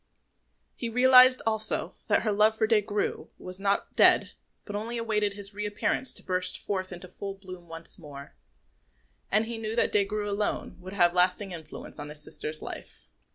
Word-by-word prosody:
He 235 - -4
realised, 255 +1 +6
also, 220 -1 +1
that - - +2
her 215 - +1
love 215 +2 +3
for 220 - +2
Des 220 -1 +3
Grieux 205 0 -3
was 185 +1 -7
not 200 0 -1
dead, - - +5 0.3
but 205 - -6
only 225 +3 -3
awaited 210 -3 0
his 200 0 -5
reappearance 210 +5 -1
to - - 0
burst 185 0 +1
forth 185 -2 -4
into 180 +1 -8
full 195 +2 -7
bloom 185 -3 -11
once 165 +3 -2
more; 140 -3 -11 1.0
and 215 +2 +3
he 230 0 -5
knew 220 0 -4
that 235 - +2
Des 205 -1 +3
Grieux 210 +1 -3
alone 205 +1 -2
would 185 +2 -9
have 175 -3 +3
lasting 180 +2 +2
influence 160 -2 -9
in 145 0 -6
his 150 0 -6
sister's 155 0 -4
life. - - -7
205 Hz, 180 wpm, -27 LUFS, 180-220 Hz, 1.0 s, realised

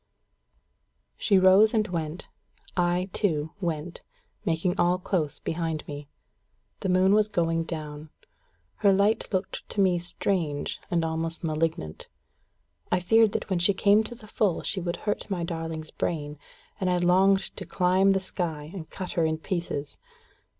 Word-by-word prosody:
She 200 - +3
rose 190 +4 +6
and 215 -1 +2
went. 165 -1 -4 0.5
I, 180 +1 +1
too, 160 -6 0
went, 165 -1 -3 0.4
making 175 +3 0
all 175 +1 +3
close 175 -5 -1
behind 165 -2 -3
me. 145 -1 -7 0.7
The 195 - -2
moon 185 +2 +4
was 215 0 +4
going 165 -4 0
down. 155 -2 -6 0.7
Her 200 - +4
light 200 +3 +2
looked 185 -1 -3
to - - -5
me 185 -3 +4
strange, 170 -4 -2
and 170 -2 +1
almost 160 +1 -3
malignant. 155 - -2 0.8
I 180 - +3
feared 220 +4 +4
that - - -2
when 185 - +2
she 190 +3 +4
came 205 +2 +4
to 240 - -7
the 225 -3 -4
full 205 -4 0
she 190 - -2
would 175 0 -2
hurt 210 - -3
my 180 -4 -2
darling's 165 -2 -4
brain, 150 -3 -3 0.4
and 185 - 0
I 180 - +2
longed 190 +2 +3
to - - -6
climb 190 +1 +3
the 195 - +2
sky, 160 -5 -4
and 170 -5 -7
cut 185 -2 -6
her 165 - +1
in 160 0 -1
pieces. 165 -5 -4
175 Hz, 155 wpm, -27 LUFS, 160-195 Hz, 0.8 s, rose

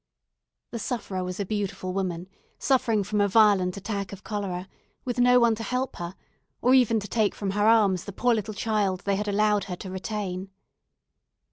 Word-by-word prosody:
The 235 - -4
sufferer 200 -6 -3
was 180 +1 -5
a 200 - -1
beautiful 195 -2 -3
woman, 180 -2 -3 0.3
suffering 230 -6 +2
from 210 +1 0
a 205 - +4
violent 200 -3 +4
attack 200 -1 -4
of 200 0 -10
cholera, 195 -4 -4 0.4
with 245 -1 -2
no 250 0 +6
one 235 -1 +4
to 220 - -5
help 255 +3 -2
her, 175 +2 -6 0.4
or 250 - +3
even 235 -4 +4
to 205 - -7
take 215 0 +1
from 200 -2 -3
her 205 +2 +2
arms 205 -5 +4
the 200 - -6
poor 245 +5 +2
little 215 -1 -3
child 200 -4 0
they 200 0 0
had 210 +2 -3
allowed 210 0 +2
her 180 - -5
to 185 +1 -8
retain. 190 -1 -4
205 Hz, 190 wpm, -26 LUFS, 190-220 Hz, 0.4 s, no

